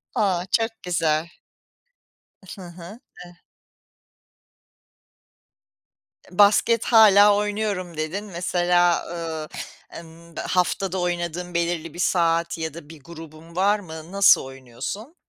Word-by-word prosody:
A! 185 -4 0
çok 225 0 +1
güzel. 165 -2 0 1.3
Hı 195 - -12
hı. 175 +6 -12 0.3
Eh 175 - -15 3.0
"Basket 210 +4 +4
hâlâ 205 -3 +6
oynuyorum." 205 -4 -3
dedin. 160 +7 -4
Mesela, 175 -1 +1
ııı, 165 -2 -5 0.4
emm, 165 0 -13
haftada 185 +2 -1
oynadığın 175 0 -3
belirli 170 -2 -2
bir 175 - -11
saat 170 -2 +1
ya 160 -1 -4
da 160 -2 -12
bir 160 -2 -12
grubun 165 +1 -13
var 200 +3 +2
mı, 160 -3 -10
nasıl 200 0 +5
oynuyorsun? 135 - -8
175 Hz, 100 wpm, -23 LUFS, 165-195 Hz, 3.0 s, hâlâ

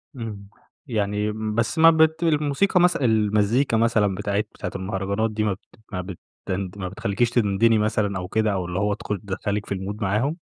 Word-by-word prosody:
امم، 105 -4 -7 0.4
يعني 105 -2 -1
بس 110 +3 -2
ما 165 0 +9
بت 160 +1 +3
الموسيقى 155 +4 +2
مث 180 0 +4
المزيكا 110 +1 +2
مثلًا 110 -4 +2
بتاعة 100 0 -1
بتاعة 105 - -7
المهرجانات 100 +3 -2
دي 110 0 -1
ما 105 -2 +1
بت 95 - -15 0.2
ما 90 -2 -3
بتند 95 +1 -6
ما 95 -2 -4
بتخليكيش 100 +4 0
تدندني 115 -1 +3
مثلًا 105 -2 0
أو 90 - -4
كده، 110 +1 +1
أو 90 -2 -2
اللي 90 +1 -3
هو 105 0 +1
دخول 105 0 -4
تدخّلِك 105 +1 -3
في 100 - -3
الMood 100 +3 -5
معاهم؟ 110 - 0
105 Hz, 175 wpm, -23 LUFS, 100-115 Hz, 0.4 s, ما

